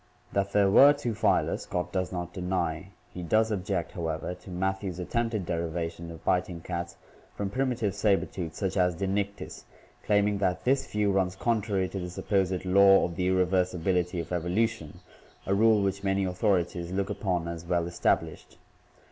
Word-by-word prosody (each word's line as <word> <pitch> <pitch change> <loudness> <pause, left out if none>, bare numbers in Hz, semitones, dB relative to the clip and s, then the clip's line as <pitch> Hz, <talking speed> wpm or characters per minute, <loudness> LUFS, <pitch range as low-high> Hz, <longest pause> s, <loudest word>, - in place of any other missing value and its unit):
That 100 0 0
there 100 -1 +3
were 140 +7 +8
two 125 -5 -3
phyla - - +1
Scott 90 0 -4
does 95 -1 -2
not 90 -1 -5
deny; 90 -2 -2 0.3
he 90 - -6
does 110 +6 +2
object, 95 -3 -2
however, 80 0 -3
to 90 +1 -14
Matthew's 95 0 -2
attempted 110 +2 -2
derivation 85 0 -3
of 80 -1 -11
biting 90 -2 0
cats 85 0 -5 0.4
from 100 -1 -3
primitive 120 -4 0
saber 100 -1 +2
tooths 85 -4 -6
such 95 -1 -2
as 90 -2 +2
Dinic 100 +2 -1
tis, - - -9 0.4
claiming 105 -1 +2
that 95 -2 0
"this 135 +1 +2
view 105 -1 0
runs 95 -1 +1
contrary 105 -4 0
to 95 - -5
the 90 -1 -5
supposed 95 0 -1
'law 95 +1 +6
of 85 - -5
the 90 0 0
irreversibility 90 -1 +1
of 85 - -6
evolution/ 90 0 -1 0.4
a 95 - 0
rule 110 0 +4
which 100 0 -1
many 95 0 +1
authorities 90 -2 0
look 95 +1 -1
upon 90 -4 -1
as 85 -1 -5
well 85 -1 0
established." 85 0 -1
95 Hz, 165 wpm, -28 LUFS, 90-100 Hz, 0.4 s, were